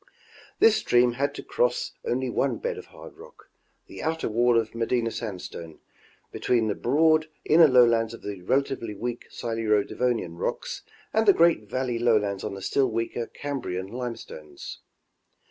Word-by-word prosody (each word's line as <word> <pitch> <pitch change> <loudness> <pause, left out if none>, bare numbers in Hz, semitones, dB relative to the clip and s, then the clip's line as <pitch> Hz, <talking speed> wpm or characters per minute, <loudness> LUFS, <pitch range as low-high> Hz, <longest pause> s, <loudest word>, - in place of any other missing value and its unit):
This 220 -1 +5
stream 120 0 +3
had 140 +4 -2
to - - -7
cross - - 0
only 460 - -1
one - - 0
bed 485 -2 -3
of - - -10
hard - - -13
rock, 485 +3 -16 0.3
the - - -10
outer 160 0 -1
wall 120 +2 +3
of 110 -1 -4
Medina 115 0 0
sandstone, 90 -8 -7 0.5
between 120 -3 +1
the 105 - +1
broad 155 +7 +3 0.2
inner 160 +1 +7
lowlands 115 -4 +4
of - - -16
the 100 -3 -6
rela 135 +9 +2
tively 115 -7 -6
weak 120 +2 -4
Siluro 115 -3 0
Devonian 115 -9 -1
rocks - - -3 0.3
and 220 0 +2
the 200 - +8
great 165 - +3
valley 125 -1 -1
lowlands 105 -5 +1
on - - -4
the 95 - -8
still 135 +5 +2
weaker 115 +1 -3
Cambrian 125 -11 -4
limestones. 115 - -7
120 Hz, 160 wpm, -26 LUFS, 110-140 Hz, 0.5 s, the